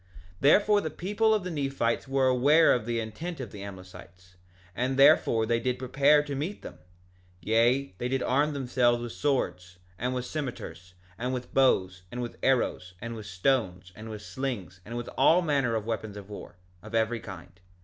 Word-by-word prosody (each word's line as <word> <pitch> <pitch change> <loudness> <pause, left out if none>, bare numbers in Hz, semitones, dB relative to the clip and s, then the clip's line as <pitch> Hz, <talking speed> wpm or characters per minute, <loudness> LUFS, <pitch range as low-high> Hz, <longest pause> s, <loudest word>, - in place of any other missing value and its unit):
2:12 - - -26
Therefore 205 +8 +5
the 155 - -3
people 205 +8 0
of 210 - -1
the 180 - -4
Nephites 135 -5 -1
were 135 0 +1
aware 140 +6 +5
of 120 -2 -2
the 120 -1 -1
intent 125 +11 -6
of 120 -6 -6
the 100 - -9
Amlicites, 95 -2 -12 0.4
and 130 +2 -1
therefore 115 -4 +5
they 115 +1 +1
did 125 +1 -1
prepare 140 +3 +3
to 145 - -6
meet 155 +9 -4
them; - - -10 0.6
yea, 115 +6 +2
they 120 - -1
did 130 0 -1
arm 145 +4 +1
themselves 125 -3 +1
with 120 -1 -5
swords, 90 -12 -2 0.2
and 125 +2 -1
with 125 -1 -3
cimeters, 95 - -6 0.2
and 125 +2 -2
with 125 0 -7
bows, 95 -9 +2
and 125 - -6
with 120 -1 -6
arrows, 105 -8 0
and 115 +3 -6
with 110 -2 -8
stones, 90 -3 -1
and 110 +2 -9
with 105 -1 -7
slings, 105 -10 -5
and 115 +2 -6
with 120 - -5
all 180 +3 +5
manner 140 -7 +1
of 110 -2 -2
weapons 110 -2 -4
of 100 0 -10
war, 100 - -9 0.3
of 110 +3 -8
every 115 +1 +1
kind. 90 -4 -11
120 Hz, 190 wpm, -28 LUFS, 105-135 Hz, 0.6 s, Therefore